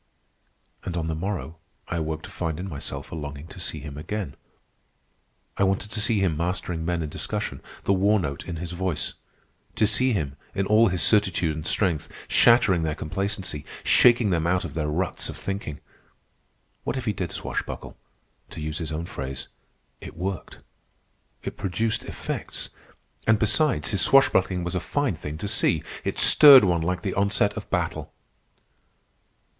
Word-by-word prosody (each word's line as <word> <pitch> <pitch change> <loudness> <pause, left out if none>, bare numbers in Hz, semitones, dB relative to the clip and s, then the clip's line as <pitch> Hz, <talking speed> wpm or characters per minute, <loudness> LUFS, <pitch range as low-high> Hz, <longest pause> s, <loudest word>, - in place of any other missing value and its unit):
And 90 -1 -4
on 80 - -1
the 80 - -2
morrow 85 -1 -4 0.3
I - - -3
awoke 80 0 -3
to - - -10
find 80 -2 -3
in 95 - -4
myself 70 -6 -6
a - - -5
longing 75 -1 -6
to - - -10
see 80 - -4
him 75 0 -8
again. 100 -1 -4 1.2
I - - +2
wanted 95 +2 0
to 110 - -2
see 110 -1 +2
him 90 -5 +1
mastering 85 0 -2
men 85 0 -1
in 75 - -4
discussion, - - -3 0.2
the 100 - +2
war 100 +3 +3
note 70 -5 -4
in 85 - -5
his 85 +1 -5
voice; 90 -4 -2 0.6
to - - +3
see 115 +5 +2
him, 75 - -2 0.2
in 100 - 0
all 110 +3 +5
his 90 -3 +1
certitude 95 -7 +3
and 80 0 -4
strength, 85 -6 +1 0.2
shattering 105 -7 +5
their 80 -1 -1
complacency, 95 -1 -3 0.2
shaking 120 -4 +5
them 85 -1 +1
out 90 +1 +1
of - - -7
their 75 0 -2
ruts 85 +4 -1
of - - -7
thinking. 95 -7 -5 1.0
What 130 - -2
if 130 - -4
he 105 - 0
did 90 -4 -4
swashbuckle? - - -5 0.5
To - - -9
use 75 0 -3
his 80 -2 -4
own 80 +2 -3
phrase, 65 -5 -5 0.5
"it - - -10
worked," 95 +2 -5 0.8
it - - -6
produced 110 +4 -1
effects. - - -5 0.6
And, 110 -1 +5
besides, 125 +6 +2
his 100 -4 +3
swashbuckling 95 -8 +4
was 90 +1 -3
a 90 - 0
fine 140 - -1
thing 75 0 -6
to 100 +5 -4
see. 90 -6 +1 0.2
It - - -2
stirred 140 -5 +9
one 85 -3 +2
like 90 +2 -2
the 95 - -1
onset 100 +1 +2
of - - -7
battle. - - -2
90 Hz, 170 wpm, -25 LUFS, 80-105 Hz, 1.2 s, stirred